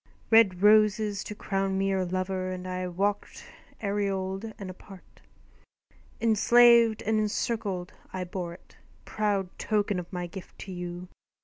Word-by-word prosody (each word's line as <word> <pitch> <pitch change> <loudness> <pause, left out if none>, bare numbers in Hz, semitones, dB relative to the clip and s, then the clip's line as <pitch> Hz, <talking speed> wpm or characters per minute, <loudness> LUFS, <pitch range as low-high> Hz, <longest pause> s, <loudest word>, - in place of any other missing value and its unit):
Red 200 -5 +5
roses 210 -1 +4
to 210 - -6
crown 195 -1 -1
me 195 0 +1
your 190 -1 0
lover, 185 +1 -2
And 185 0 -6
I 185 0 -3
walked 200 +3 -2 0.4
aureoled 200 0 -2
and 195 - -7
apart. 190 0 -15 1.0
Enslaved 230 0 +5
and 220 0 +1
encircled, 210 -3 -2 0.2
I 185 -1 -3
bore 175 -1 -5
it, - - -21 0.3
Proud 205 -3 -1
token 205 -3 0
of 175 - -9
my 180 -2 -3
gift 180 +1 -10
to 195 - -8
you. 175 0 -6
195 Hz, 135 wpm, -28 LUFS, 185-210 Hz, 1.0 s, Red